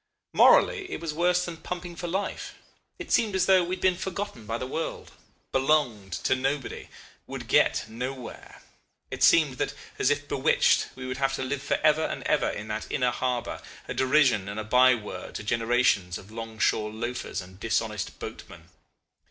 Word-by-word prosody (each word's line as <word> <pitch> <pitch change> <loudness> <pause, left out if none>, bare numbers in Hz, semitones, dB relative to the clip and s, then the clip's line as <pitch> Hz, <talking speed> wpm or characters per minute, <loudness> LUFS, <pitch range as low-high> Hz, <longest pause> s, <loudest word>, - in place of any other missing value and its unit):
Morally 410 -6 +5
it - - -3
was 165 -2 -4
worse 180 +2 +2
than 170 -2 -6
pumping 175 +1 -6
for 175 +1 -5
life. 190 +4 -3 0.4
It - - -8
seemed 215 -4 +2
as 185 -1 +3
though 185 -1 +5
we 180 +2 -2
had - - -14
been 185 -1 +4
forgotten 185 - -5
by 115 +1 -2
the 130 - -4
world, 160 +5 -4 0.4
belonged 130 -9 +1
to - - +3
nobody, 135 +1 -3 0.4
would - - -7
get - - +3
nowhere; 125 +2 -7 0.5
it - - -6
seemed 150 -6 +5
that, - - -1 0.2
as 130 - +3
if 145 0 0
bewitched, 140 +2 +3
we 130 - -7
would 130 0 -4
have 135 -1 +1
to 130 - -3
live 135 +1 -2
for 140 - 0
ever 155 0 +4
and - - -3
ever - - +2
in 105 - -5
that 110 0 -4
inner 125 -1 +1
harbour, 125 0 -2 0.3
a - - -3
derision 130 -7 +3
and 100 +2 -5
a - - -3
by 125 +3 +5
word 105 -3 -8
to - - -4
generations 115 -4 +1
of 100 - -13
long 115 0 -7
shore 105 0 +1
loafers 120 +3 -4
and 95 0 -10
dishonest 110 -2 -2
boatmen. - - -9
130 Hz, 185 wpm, -27 LUFS, 115-165 Hz, 0.5 s, Morally